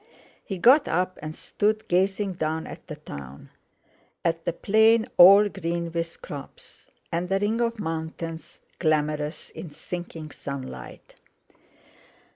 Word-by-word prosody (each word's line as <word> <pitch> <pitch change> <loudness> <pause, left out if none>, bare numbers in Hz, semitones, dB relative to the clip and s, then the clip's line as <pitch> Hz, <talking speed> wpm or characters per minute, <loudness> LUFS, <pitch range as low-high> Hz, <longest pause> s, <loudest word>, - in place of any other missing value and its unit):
He 195 - -5
got 265 - +6
up, 180 +2 0
and 155 +1 -6
stood 215 +1 -1
gazing 190 +2 +1
down 160 -1 -2
at - - -10
the 150 - -6
town, 70 - -10 0.7
at 165 0 0
the - - +1
plain 220 +5 +4
all 200 +4 +9
green 170 -3 -3
with 165 0 -4
crops, 140 -2 -10 0.2
and 175 +2 -1
the 195 - +2
ring 215 +4 0
of 230 0 0
mountains 165 -2 -5 0.2
glamorous 150 -1 0
in 165 - -8
sinking 165 -1 -7
sunlight. 140 -2 -8
170 Hz, 125 wpm, -26 LUFS, 155-200 Hz, 0.7 s, all